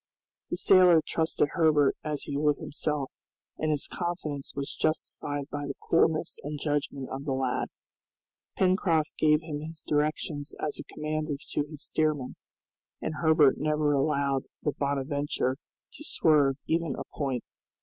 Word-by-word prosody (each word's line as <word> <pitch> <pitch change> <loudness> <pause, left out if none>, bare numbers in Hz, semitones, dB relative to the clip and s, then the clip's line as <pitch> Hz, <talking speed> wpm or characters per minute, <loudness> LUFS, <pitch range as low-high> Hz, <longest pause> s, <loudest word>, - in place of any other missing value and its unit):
The - - -2
sailor 180 -3 +7
trusted 160 -2 +1
Herbert 155 -5 +4
as 150 -2 -2
he 140 - -4
would 150 0 +2
himself, 150 -2 -2 0.5
and 155 - 0
his 150 -1 +1
confidence 165 -6 -4
was 140 0 -4
justified 145 -2 -2
by 145 -1 -3
the 140 - -4
coolness 160 -1 +2
and 150 0 -5
judgment 145 -2 -1
of 135 +1 -4
the 135 - 0
lad. 130 -1 0 0.9
Pencroft 180 -4 +2
gave 150 0 +4
him 155 -2 -4
his 160 +1 -7
directions 150 0 -1
as 150 - -3
a - - -9
commander 155 0 -2 0.2
to 150 - 0
his 150 -1 -8
steersman, 150 -5 0 0.6
and 155 - -3
Herbert 160 -4 +5
never 150 0 +2
allowed 140 -1 +1 0.2
the 150 - +1
"Bonadventure" 140 -1 -1 0.4
to - - -10
swerve 150 - +3
even 165 -3 0
a - - -4
point. 135 -4 -2
150 Hz, 145 wpm, -28 LUFS, 140-155 Hz, 0.9 s, sailor